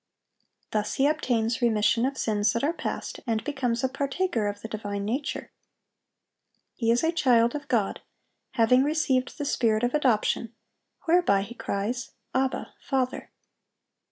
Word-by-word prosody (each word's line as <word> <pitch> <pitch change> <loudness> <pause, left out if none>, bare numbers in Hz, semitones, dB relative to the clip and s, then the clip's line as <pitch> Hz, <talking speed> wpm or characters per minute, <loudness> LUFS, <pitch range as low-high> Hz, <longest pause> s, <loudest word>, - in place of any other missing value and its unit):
Thus 210 -1 -1
he 270 - +3
obtains 245 -6 +1
"remission 230 +1 +3
of 270 0 -4
sins 210 -1 +1
that 235 - -1
are 310 +4 +2
past," - - -4
and 225 -1 0
becomes 250 -4 -1
a - - +4
partaker 275 - -1
of 205 0 -4
the - - -5
divine 205 -2 -4
nature. 260 +7 -3 1.2
He 230 -2 -1
is 235 +4 +3
a 325 - +3
child 240 -8 +3
of 295 -1 -5
God, 225 -7 0 0.5
having 240 +3 +4
received 280 -4 0
the 290 - -3
spirit 225 -4 +1
of 245 - +1
adoption, 235 -4 +1 0.5
whereby 330 - +3
he 225 - -8
cries, 235 +3 -3 0.2
"Abba, 260 0 -1
Father!" 260 -2 -2
245 Hz, 145 wpm, -27 LUFS, 220-275 Hz, 1.2 s, a